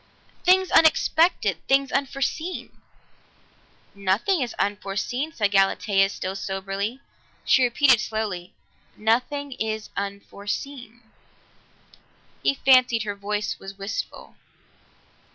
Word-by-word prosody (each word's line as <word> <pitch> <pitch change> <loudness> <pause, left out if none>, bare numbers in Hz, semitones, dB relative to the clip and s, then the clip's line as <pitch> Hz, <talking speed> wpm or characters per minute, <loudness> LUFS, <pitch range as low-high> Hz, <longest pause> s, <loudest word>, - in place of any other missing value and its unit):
"Things 375 +1 +4
unexpected 325 +2 +4
things 275 0 +3
unforeseen." 275 +6 -2 1.2
"Nothing 200 - +1
is 245 -3 -3
unforeseen," 205 +8 -2
said 205 -9 0
Galatea, 195 0 +3
still 190 -1 -5
soberly. 195 +5 -4 0.4
She 260 - +4
repeated 250 0 +4
slowly, 210 -6 -4 0.4
"Nothing 255 +6 0
is 220 -3 -4
unforeseen." 210 +5 -6 1.4
He 275 - +2
fancied 255 -4 +4
her 205 -1 -3
voice 210 +1 -3
was 195 0 -10
wistful. 195 +1 -6
220 Hz, 90 wpm, -24 LUFS, 200-275 Hz, 1.4 s, Things